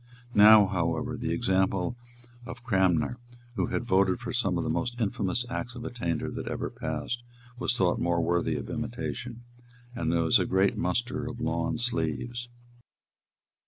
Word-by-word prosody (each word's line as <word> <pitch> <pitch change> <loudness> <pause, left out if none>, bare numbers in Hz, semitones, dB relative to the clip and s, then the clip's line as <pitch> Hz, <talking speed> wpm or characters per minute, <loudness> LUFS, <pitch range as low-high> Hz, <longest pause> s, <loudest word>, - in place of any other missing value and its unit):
Now, 105 -1 +9
however, 85 -4 -1
the - - -3
example 95 +2 +1 0.5
of 120 0 -8
Cranmer, 95 - +2 0.4
who - - 0
had 120 - -2
voted 95 -3 +3
for 120 0 -5
some 95 -7 +1
of 85 - -1
the - - -3
most 120 +9 -2
infamous 105 +1 0
acts 125 0 -4
of 120 0 -7
attainder 85 -11 -2
that - - -5
ever - - -3
passed, 120 0 -3 0.4
was 120 - 0
thought 90 -2 +2
more 85 0 +1
worthy 85 -1 +1
of 70 - -4
imitation; 120 0 -5 0.5
and 80 -8 -1
there 85 -1 +2
was 80 - +5
a - - 0
great 95 +1 +2
muster 120 +6 -1
of 120 -1 -6
lawn 80 -1 -1
sleeves. 120 +3 -2
100 Hz, 160 wpm, -28 LUFS, 85-120 Hz, 0.5 s, Now